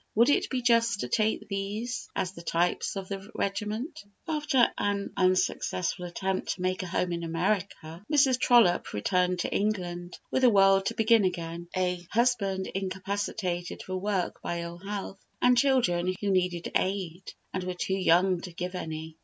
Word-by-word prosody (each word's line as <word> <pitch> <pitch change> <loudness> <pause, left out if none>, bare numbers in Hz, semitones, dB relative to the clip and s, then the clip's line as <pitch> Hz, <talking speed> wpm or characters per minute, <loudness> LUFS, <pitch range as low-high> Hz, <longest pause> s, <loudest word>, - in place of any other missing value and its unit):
Would 235 +5 +5
it 285 - +2
be 255 -2 -2
just 230 -3 +3
to - - -2
take 215 - 0
these 205 +5 -4
as 185 - -1
the 170 - -11
types 170 +3 0
of 195 -1 -5
the 195 +1 -6
regiment? 215 - -3 0.2
After 300 -6 +2
an 200 -1 -1
unsuccessful 185 -1 +1
attempt 190 +2 -2
to 180 - -10
make 185 0 0
a 185 - -5
home 175 +1 -1
in 170 0 -2
America, 170 0 -2
Mrs. 270 -4 +4
Trollope 235 -10 +4
returned 180 - +1
to - - -2
England, 180 -4 -2
with 260 - +1
the 255 - +7
world 195 -2 +5
to - - -2
begin 225 -1 +4
again, 170 -2 -3
a 180 -1 0
husband 205 -5 +1
incapacitated 190 -1 -3
for 185 - -5
work 190 -1 -2
by 170 0 -3
ill 170 0 -7
health, 195 0 -5 0.2
and 250 0 +5
children 210 -10 +2
who 205 -1 0
needed 180 -2 0
aid, 185 -2 -2 0.2
and 185 - -2
were 180 0 -3
too 190 - -2
young 185 -1 +3
to 180 - -7
give 180 +2 -5
any. 160 -2 -6
190 Hz, 170 wpm, -28 LUFS, 175-215 Hz, 0.2 s, the